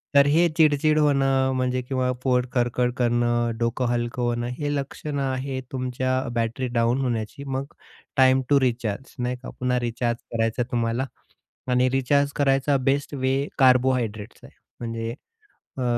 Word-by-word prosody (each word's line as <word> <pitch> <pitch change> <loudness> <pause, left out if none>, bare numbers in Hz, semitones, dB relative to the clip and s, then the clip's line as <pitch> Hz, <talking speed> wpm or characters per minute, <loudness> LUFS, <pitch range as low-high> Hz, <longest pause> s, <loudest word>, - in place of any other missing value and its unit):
तर 140 0 +7
हे 170 +3 +5
चिडचिड 155 -1 +4
होणं 135 -2 +3
म्हणजे 130 0 0
किंवा 125 0 -1
पोट 125 -2 +2
खडखड 125 0 +1
करणं, 120 -1 +1
डोकं 115 +2 0
हलकं 120 0 -2
होणं, 120 0 -1
हे 145 -1 -1
लक्षणं 140 +1 -4
आहे 130 0 -2
तुमच्या 130 0 -1
बॅटरी 115 +3 -1
डाउन 120 +3 +2
होण्याची, 120 +2 -3
मग 135 0 -4 0.4
टाईम 130 0 +5
टु 140 -1 +5
रिचार्ज 120 -2 -2
नाही 125 +1 -1
का, - - -6
पुन्हा 125 0 +1
रिचार्ज 120 0 -1
करायचं 115 +1 0
आहे 120 - -4
तुम्हाला. 115 +2 0 0.7
आणि 125 +1 +3
रिचार्ज 140 +2 +2
करायचा 135 0 +2
बेस्ट 135 +3 0
वे 135 +1 0
कार्बोहाइड्रेट्स 125 -5 +2
आहे. - - -15 0.2
म्हणजे 115 -1 -4 0.6
अ, 130 - -2
130 Hz, 145 wpm, -24 LUFS, 120-135 Hz, 0.7 s, तर